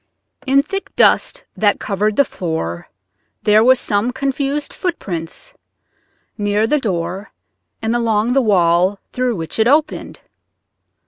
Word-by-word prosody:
In 275 +1 +4
thick 390 +6 -5
dust - - +3
that 205 -1 +2
covered 210 +1 -1
the 280 - +4
floor 160 - -4 0.6
were 220 +5 +6
some 220 -1 0
confused 275 +2 -2
footprints 210 - -5 0.9
near 205 +1 +1
the 300 +6 +1
door 185 -3 -3 0.5
and 225 +2 0
along 230 0 +1
the 270 - +3
wall 185 -3 +3
through 250 -2 -1
which 165 +3 -5
it 220 - +4
opened. 300 +3 0
220 Hz, 120 wpm, -18 LUFS, 195-270 Hz, 0.9 s, were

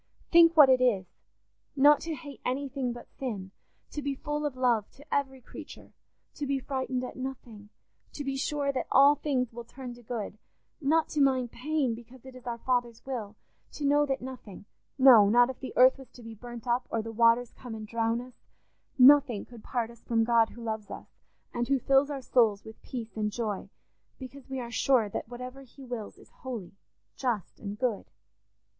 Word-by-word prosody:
Think 335 -1 +7
what 295 -3 +10
it 260 -1 +4
is—not 255 +6 +1
to 330 -1 -4
hate 285 0 -11
anything 270 -1 -2
but 240 0 -10
sin; 205 -8 -4 0.4
to 295 - -4
be 280 0 -2
full 295 +2 -2
of 275 - -6
love 240 -5 +1
to 285 - -17
every 270 -2 -1
creature; - - -12 0.4
to 290 - -4
be 275 0 +1
frightened 260 -1 -3
at 250 - -6
nothing; 240 -5 -8 0.4
to 290 - -5
be 275 -1 -2
sure 280 +1 -1
that 265 - -3
all 280 +2 +7
things 260 -5 -1
will 235 +1 -7
turn 250 +1 -9
to 240 - -14
good; 215 -3 -5 0.4
not 315 +3 +2
to 300 - 0
mind 260 -3 +2
pain, 285 -1 -1
because 240 +2 -12
it 260 -1 -11
is 250 -1 -12
our 235 -1 -3
Father's 240 -1 -1
will; 225 -6 -5 0.4
to 295 - -4
know 290 +1 +4
that 270 -2 -2
nothing—no, 240 -1 +3
not 245 +3 +5
if 260 - -14
the 265 - -6
earth 255 +2 +6
was 265 -3 -12
to 245 - -13
be 225 0 -8
burnt 240 +1 -10
up, 245 +1 0
or 225 -1 -1
the 225 - -6
waters 230 +1 +3
come 245 -3 -8
and 215 -1 -7
drown 230 +1 0
us—nothing 255 0 +2
could 235 -3 -14
part 235 -3 -2
us 235 - -17
from 225 -1 +1
God 230 -1 +3
who 235 - -11
loves 220 -2 -4
us, - - -9 0.4
and 240 0 -1
who 275 +1 +3
fills 270 +3 +3
our 280 -2 -4
souls 225 -6 +2
with 220 0 -12
peace 235 -3 -7
and 210 -1 -1
joy, 210 -3 -3 0.5
because 270 +1 -11
we 265 -1 -3
are 235 -1 -6
sure 235 -2 +2
that 210 - -5
whatever 250 +2 -8
he 270 +1 -14
wills 240 -4 -6
is - - -18
holy, 235 -9 -6 0.4
just, 240 -7 -3
and 205 -1 -6
good. 235 -4 -2
250 Hz, 190 wpm, -29 LUFS, 230-270 Hz, 0.5 s, what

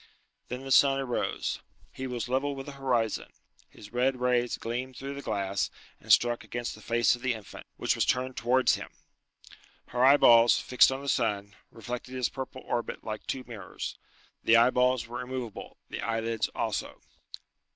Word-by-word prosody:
Then 125 +2 -5
the 135 - -6
sun 135 +1 +6
arose. 130 -3 -2 0.3
He 130 - -5
was 125 -2 -3
level 135 +3 0
with 135 0 -7
the 145 - -7
horizon. 125 -5 -1 0.4
His 105 +2 -14
red 125 +1 +1
rays 125 -1 +1
gleamed 125 +2 -4
through 140 +1 -5
the 140 - -7
glass, 100 -5 -1 0.3
and - - -4
struck 120 0 +4
against 120 0 -4
the 110 - -13
face 115 +1 +2
of 120 - -14
the 130 -2 0
infant, 110 -3 -11
which - - +1
was - - +1
turned 130 0 0
towards 125 +3 +3
him. - - -4 1.0
Her 125 0 0
eyeballs, 120 -4 +7
fixed 125 +1 +4
on 130 +1 -3
the 140 - -8
sun, 105 -6 0 0.2
reflected 120 +2 -7
his 125 -2 0
purple 130 0 -7
orbit 120 -1 -3
like 110 -1 -6
two 130 - -3
mirrors. 110 -6 -7 0.5
The 115 - +6
eyeballs 125 0 +3
were 120 +1 -6
immovable, 125 -3 -6
the - - -5
eyelids 115 0 -1
also. - - -3
125 Hz, 170 wpm, -29 LUFS, 115-130 Hz, 1.0 s, eyeballs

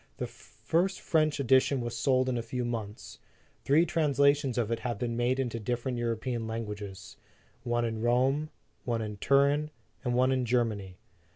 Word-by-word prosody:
The - - -2
first 180 +3 -2
French 155 -2 +1
edition 130 +1 +3
was 120 -1 -4
sold 130 +2 +2
in 130 - 0
a 120 - -1
few 120 +2 -3
months. 110 -3 -5 0.4
Three 155 +5 +4
translations 140 -5 +2
of 115 -2 0
it 115 - 0
have 120 -2 -3
been 115 +1 -2
made 120 +2 +1
into 120 -3 -2
dif 120 +2 -2
ferent 125 -2 -2
European 115 0 -2
languages 105 -3 -6 0.4
one 120 -1 0
in 110 -1 -3
Rome, 130 +6 +2 0.3
one 115 -2 -1
in 105 -1 -5
Turin, 140 +5 +3 0.3
and 125 -2 0
one 130 +1 +3
in 130 -1 +1
Germany. 110 -6 -1
120 Hz, 170 wpm, -29 LUFS, 115-135 Hz, 0.4 s, Three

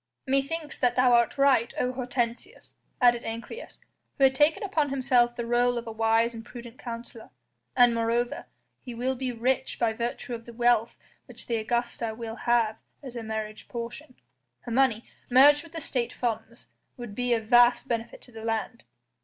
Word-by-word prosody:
"Methinks 275 +3 -2
that 245 - +2
thou 250 -1 +4
art 235 +2 +3
right, 270 -4 +3
O 250 0 0
Hortensius," 250 - -4 0.3
added 240 -1 +4
Ancyrus, 230 - -7 0.4
who 275 - +1
had 265 0 +6
taken 295 +8 +2
upon 320 -7 0
himself 250 -3 +2
the 240 - -3
rôle 240 +1 +2
of 235 - -4
a 225 - -6
wise 225 +1 +2
and 225 -1 -8
prudent 240 +2 -11
counsellor, 235 -2 -8 0.5
"and 245 -1 +6
moreover 230 +1 -1 0.3
he 245 -2 -9
will 255 +3 -1
be 260 0 -3
rich 255 +3 -1
by 230 -2 +1
virtue 235 +2 -4
of 230 -1 -7
the 235 - -9
wealth 240 -1 +2 0.3
which - - -12
the 235 - -1
Augusta 230 0 -2
will 225 -1 -6
have 230 -3 +1 0.3
as 260 -3 -8
her 240 - -5
marriage 220 -1 -5
portion; 245 +3 -7 0.5
her 240 - -8
money, 240 -2 +2 0.2
merged 285 +4 +7
with 335 +1 -15
the 330 - -4
State 245 -4 -2
funds, 230 -1 -4 0.3
would 240 -4 -8
be 245 +2 +1
of 220 -1 -4
vast 240 +2 +5
benefit 230 -1 -4
to 250 - -15
the 225 -1 -10
land." 225 +1 -3
240 Hz, 180 wpm, -27 LUFS, 230-255 Hz, 0.5 s, merged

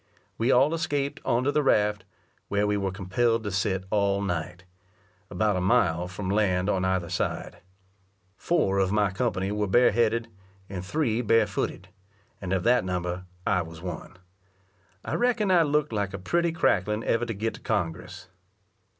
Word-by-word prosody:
We 115 +4 +2
all 135 +5 +4
escaped 145 -4 -2
on 120 +2 +1
to 140 - +2
the 150 - +2
raft, 105 -7 +2 0.4
where 100 +1 +1
we 105 0 +1
were 100 -1 -1
compelled 110 +5 0
to 105 - -3
sit 95 0 0
all 100 -2 +2
night, 90 -1 -3 0.7
about 105 -2 +1
a 90 - -1
mile 90 -2 +2
from 95 +2 -6
land 100 -2 +1
on 95 - 0
either 95 -2 0
side. 90 +1 -3 0.8
Four 100 - +1
of 95 -1 +1
my 105 -2 +2
company 95 -2 -1
were 105 0 -1
bareheaded, 115 +1 +3 0.4
and 95 -2 -6
three 120 +2 0
bare 115 -1 +4
footed; 95 -2 -4 0.5
and 95 -2 -5
of 95 -2 0
that 125 +1 +3
number 90 0 -3 0.2
I 90 - +2
was 80 -1 -9
one. 90 0 -7 0.9
I - - -3
reckon 235 -5 +1
I 175 -2 +6
looked 150 -3 +1
like 100 -2 -2
a - - -4
pretty 170 - 0
cracklin 105 - +1
ever 115 +1 0
to 115 - -2
get 110 +3 -2
to - - -11
Congress!!! 90 -2 -3
100 Hz, 165 wpm, -26 LUFS, 95-120 Hz, 0.9 s, I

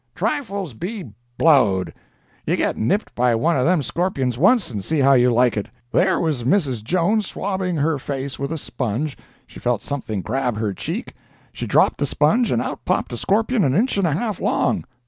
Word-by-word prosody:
"Trifles 200 - -2
be—blowed! 120 - 0 0.5
You - - +2
get - - 0
nipped 160 - -1
by 120 -1 +2
one 160 +9 +1
of 130 +1 +2
them 175 -4 +2
scorpions 140 -7 -1
once, 190 - +3
and 105 -4 -4
see 160 - -1
how 140 -1 +5
you 125 -1 +5
like 120 0 +3
it! 105 - -3 0.2
There 190 +1 +3
was 150 -7 -1
Mrs. 130 - +1
Jones, 185 - +1
swabbing 190 -2 -2
her 150 -1 0
face 135 0 -5
with 140 +2 -3
a 165 - -2
sponge; 130 +1 -3 0.3
she - - -13
felt 120 -3 -1
something 120 -8 -4
grab 130 -4 -1
her 105 -2 -1
cheek; - - -5 0.4
she - - -5
dropped - - +3
the 145 - +1
sponge 215 - +2
and - - +1
out - - -5
popped - - -1
a - - -3
scorpion 220 +2 +1
an 135 -2 +2
inch 235 +8 +2
and 195 -3 +2
a 155 - +1
half 210 +4 -2
long! - - 0
145 Hz, 190 wpm, -21 LUFS, 125-185 Hz, 0.5 s, how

